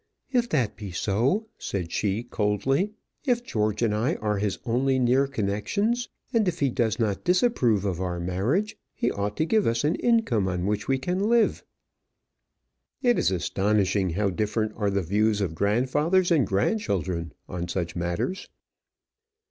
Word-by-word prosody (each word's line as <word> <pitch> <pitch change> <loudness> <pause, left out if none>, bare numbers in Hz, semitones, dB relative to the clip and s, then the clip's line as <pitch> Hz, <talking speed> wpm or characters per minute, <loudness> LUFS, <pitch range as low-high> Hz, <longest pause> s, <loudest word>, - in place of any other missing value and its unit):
"If 240 -2 +1
that 125 -9 0
be 105 -4 -7
so," 115 - +1
said 90 -4 -4
she, 105 +3 -1
coldly, 120 - 0 0.3
"if 245 -4 +1
George 105 - -1
and 110 -3 +2
I 120 +10 +1
are 105 -1 -1
his 100 -1 -1
only 130 +3 +1
near 130 +2 +3
connections, 140 - -1 0.2
and 225 -4 +3
if 175 -1 -1
he 140 -3 +2
does 115 -3 0
not 105 -4 -1
disapprove 175 - +2
of 95 -3 -2
our 90 -1 -2
marriage, 105 - 0 0.2
he 120 - 0
ought 105 +1 -3
to 155 - +2
give 215 +4 +2
us 115 +2 +1
an 150 +3 +2
income 200 - +2
on 90 -1 -2
which 105 0 -1
we 135 - +2
can 180 +10 -1
live." 235 -2 +3 1.4
It 245 -1 +4
is - - +3
astonishing 95 +1 +1
how 100 +4 0
different 110 +3 -1
are 105 -2 0
the 100 -1 0
views 105 +4 +1
of 95 -6 -1
grandfathers 130 - +2
and 145 - +4
grandchildren 95 - -1
on 85 -1 -4
such 85 -1 -3
matters! 85 - -2
110 Hz, 160 wpm, -26 LUFS, 100-155 Hz, 1.4 s, It